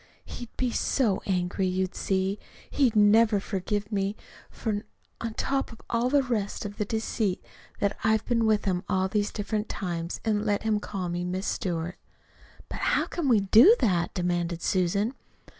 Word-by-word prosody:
He'd 240 Hz, -2 st, -8 dB
be 250 Hz, -2 st, 0 dB
so 230 Hz, -4 st, +1 dB
angry, 185 Hz, 0 st, 0 dB
you 185 Hz, 0 st, 0 dB
see. 190 Hz, +1 st, -1 dB, 0.3 s
He'd 255 Hz, -6 st, +2 dB
never 215 Hz, +1 st, +5 dB
forgive 205 Hz, +2 st, -3 dB
me, 200 Hz, 0 st, 0 dB, 0.3 s
for 210 Hz, -3 st, -3 dB, 0.4 s
on 230 Hz, -1 st, -4 dB
top 270 Hz, -1 st, -1 dB
of 230 Hz, -, -12 dB
all 235 Hz, +2 st, +1 dB
the 280 Hz, 0 st, +3 dB
rest 225 Hz, -4 st, -2 dB
is 205 Hz, 0 st, -6 dB
the 210 Hz, -, -1 dB
deceit 220 Hz, -2 st, -2 dB, 0.3 s
that 200 Hz, 0 st, +1 dB
I've 220 Hz, 0 st, +2 dB
been 230 Hz, -2 st, +2 dB
with 215 Hz, -1 st, +2 dB
him 185 Hz, -2 st, 0 dB
all 190 Hz, 0 st, +2 dB
these 205 Hz, +1 st, 0 dB
different 210 Hz, +1 st, -3 dB
times, 170 Hz, -2 st, -3 dB
and 210 Hz, -2 st, +1 dB
let 205 Hz, -1 st, 0 dB
him 215 Hz, -1 st, +1 dB
call 195 Hz, -3 st, -4 dB
me 175 Hz, +1 st, -2 dB
'Miss 185 Hz, +2 st, -3 dB
Stewart.'" 175 Hz, -1 st, -2 dB, 0.7 s
"But -, -, -6 dB
how -, -, +2 dB
can 335 Hz, -5 st, -3 dB
we 225 Hz, -4 st, +5 dB
do 225 Hz, -, +7 dB
that?" 180 Hz, -7 st, +1 dB
demanded 175 Hz, -2 st, -1 dB
Susan. 200 Hz, +5 st, +1 dB
205 Hz, 170 wpm, -27 LUFS, 185-220 Hz, 0.7 s, do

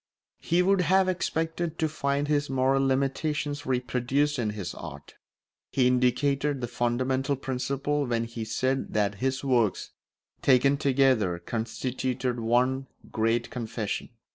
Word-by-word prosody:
He 175 Hz, +2 st, +2 dB
would 195 Hz, 0 st, +3 dB
have 190 Hz, +1 st, +3 dB
expected 170 Hz, -2 st, -1 dB
to 160 Hz, -, +1 dB
find 145 Hz, -1 st, -1 dB
his 145 Hz, -1 st, +1 dB
moral 135 Hz, +1 st, +2 dB
limitations 145 Hz, +2 st, -1 dB
reproduced 130 Hz, +3 st, 0 dB
in 110 Hz, -3 st, 0 dB
his 90 Hz, -3 st, -4 dB
art. 75 Hz, -4 st, -9 dB, 0.6 s
He 130 Hz, -, +2 dB
indicated 135 Hz, +3 st, +2 dB
the 120 Hz, -, -3 dB
fundamental 130 Hz, +3 st, 0 dB
principle 140 Hz, +2 st, -2 dB
when 115 Hz, -1 st, 0 dB
he 115 Hz, -1 st, -5 dB
said 130 Hz, +4 st, -1 dB
that 100 Hz, -1 st, +1 dB
his 130 Hz, +1 st, 0 dB
works, 120 Hz, -7 st, +1 dB, 0.5 s
taken 135 Hz, +1 st, +4 dB
together, 130 Hz, -, +2 dB
constituted 125 Hz, +4 st, -3 dB
one 125 Hz, +4 st, +1 dB, 0.2 s
great 115 Hz, +1 st, 0 dB
confession. 115 Hz, -3 st, -4 dB
130 Hz, 125 wpm, -27 LUFS, 120-145 Hz, 0.6 s, taken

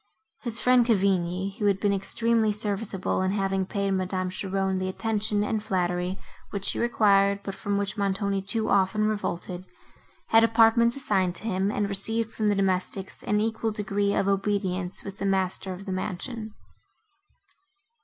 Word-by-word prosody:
His 235 Hz, -2 st, -2 dB
friend 250 Hz, -1 st, +5 dB
Cavigni, 195 Hz, -3 st, 0 dB
who 205 Hz, -, +2 dB
had 195 Hz, -1 st, +2 dB
been 200 Hz, -1 st, +2 dB
extremely 225 Hz, +3 st, +1 dB
serviceable, 205 Hz, -2 st, -2 dB
in 185 Hz, +1 st, +1 dB
having 195 Hz, -2 st, 0 dB
paid 200 Hz, 0 st, -1 dB
Madame 185 Hz, -1 st, -1 dB
Cheron 190 Hz, 0 st, -1 dB
the 185 Hz, 0 st, -2 dB
attention 210 Hz, 0 st, 0 dB
and 215 Hz, 0 st, -1 dB
flattery, 180 Hz, -2 st, -1 dB, 0.3 s
which 200 Hz, -1 st, -4 dB
she -, -, 0 dB
required, 200 Hz, -4 st, +3 dB
but 195 Hz, -, -4 dB
from 205 Hz, 0 st, -2 dB
which 200 Hz, +1 st, -2 dB
Montoni 200 Hz, 0 st, 0 dB
too 220 Hz, +3 st, -2 dB
often 200 Hz, +2 st, +3 dB
revolted, 185 Hz, -3 st, -3 dB, 0.6 s
had 225 Hz, 0 st, +6 dB
apartments 230 Hz, +1 st, +4 dB
assigned 190 Hz, -10 st, 0 dB
to -, -, -8 dB
him, 195 Hz, -3 st, 0 dB
and 205 Hz, -1 st, 0 dB
received 225 Hz, +3 st, 0 dB
from 215 Hz, -, -1 dB
the 205 Hz, -, +3 dB
domestics 190 Hz, 0 st, -1 dB
an 210 Hz, 0 st, 0 dB
equal 220 Hz, +1 st, 0 dB
degree 205 Hz, -1 st, -1 dB
of 195 Hz, -, +1 dB
obedience 195 Hz, -2 st, 0 dB
with 195 Hz, -1 st, -8 dB
the 200 Hz, -, -2 dB
master 190 Hz, 0 st, -1 dB
of 185 Hz, +2 st, -7 dB
the 195 Hz, -, -4 dB
mansion. 215 Hz, +4 st, -4 dB
200 Hz, 160 wpm, -26 LUFS, 190-215 Hz, 0.6 s, had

